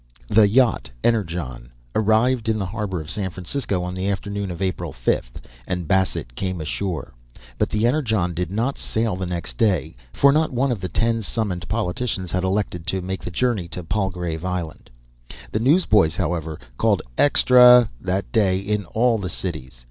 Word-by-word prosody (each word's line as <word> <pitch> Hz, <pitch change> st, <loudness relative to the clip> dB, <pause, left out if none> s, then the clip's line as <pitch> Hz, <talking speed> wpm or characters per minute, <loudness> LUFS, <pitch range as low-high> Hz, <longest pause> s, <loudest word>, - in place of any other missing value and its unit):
The 105 Hz, -1 st, +6 dB
yacht 120 Hz, -, +2 dB
Energon 80 Hz, -, -1 dB, 0.2 s
arrived 110 Hz, +2 st, +2 dB
in 110 Hz, -, +1 dB
the 100 Hz, -, -2 dB
harbour 95 Hz, -2 st, -3 dB
of 75 Hz, +2 st, -6 dB
San 100 Hz, -3 st, -2 dB
Francisco 95 Hz, +1 st, -3 dB
on 90 Hz, 0 st, -4 dB
the 95 Hz, +2 st, -2 dB
afternoon 100 Hz, 0 st, -3 dB
of 85 Hz, -, -6 dB
April 95 Hz, -1 st, -2 dB
5, -, -, -1 dB, 0.4 s
and 90 Hz, -3 st, -3 dB
Bassett 95 Hz, -9 st, 0 dB
came 95 Hz, +5 st, -3 dB
ashore. 80 Hz, +1 st, -4 dB, 0.5 s
But -, -, +1 dB
the 110 Hz, +1 st, 0 dB
Energon 110 Hz, -, +1 dB
did 85 Hz, 0 st, -2 dB
not 115 Hz, +8 st, -1 dB
sail 110 Hz, -3 st, -1 dB
next 85 Hz, -9 st, -4 dB
day, 90 Hz, -, +1 dB, 0.2 s
for 140 Hz, -, +5 dB
not 155 Hz, +2 st, +2 dB
one 130 Hz, +2 st, +1 dB
of 115 Hz, -, -2 dB
the 95 Hz, -, -3 dB
ten 115 Hz, 0 st, +1 dB
summoned 95 Hz, -5 st, -2 dB
politicians 105 Hz, -3 st, -2 dB
had 90 Hz, -1 st, 0 dB
elected 95 Hz, -3 st, -1 dB
to 95 Hz, +1 st, -1 dB
make 95 Hz, +1 st, -4 dB
the -, -, -5 dB
journey 105 Hz, -1 st, 0 dB
to 90 Hz, +1 st, -7 dB
Palgrave 90 Hz, -3 st, -2 dB
Island. 90 Hz, -4 st, -4 dB, 0.6 s
The 110 Hz, -, 0 dB
newsboys, 110 Hz, -, +4 dB
however, 80 Hz, -3 st, -2 dB, 0.2 s
called -, -, +2 dB
"Extra" 125 Hz, -4 st, +6 dB
that 95 Hz, +1 st, -2 dB
day 100 Hz, -5 st, +3 dB
in 100 Hz, +1 st, -2 dB
all 115 Hz, +4 st, +1 dB
the 95 Hz, -2 st, -4 dB
cities. 75 Hz, -9 st, -6 dB
95 Hz, 170 wpm, -22 LUFS, 90-110 Hz, 0.6 s, The